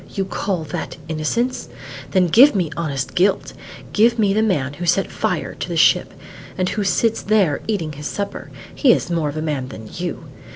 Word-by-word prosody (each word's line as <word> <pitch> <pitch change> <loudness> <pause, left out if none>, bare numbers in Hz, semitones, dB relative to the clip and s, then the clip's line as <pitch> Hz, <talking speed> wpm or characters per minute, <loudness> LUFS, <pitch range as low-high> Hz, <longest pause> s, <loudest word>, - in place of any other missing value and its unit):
You 195 -2 -2
call 190 -2 -2
that 150 - -5
innocence? 165 +11 -1 0.4
Then 185 -2 +3
give 235 - +6
me 175 -6 0
honest 140 -6 -3
guilt! 190 +2 +1 0.4
Give 230 +3 +4
me 205 -3 +3
the 215 - +2
man 150 -11 0
who 175 +4 -5
set 180 +3 +2
fire - - -2
to - - -6
the - - -2
ship, - - +4 0.5
and 185 -1 0
who 210 - -1
sits 225 +3 +1
there 200 -8 +2
eating 185 -8 -1
his 150 0 -6
supper; 200 -1 -5 0.2
he 260 -5 +5
is - - -2
more 165 -3 0
of 145 - -6
a 155 - -2
man 145 -5 -2
than 110 -4 -9
you. 175 -1 -4
180 Hz, 195 wpm, -20 LUFS, 155-210 Hz, 0.5 s, give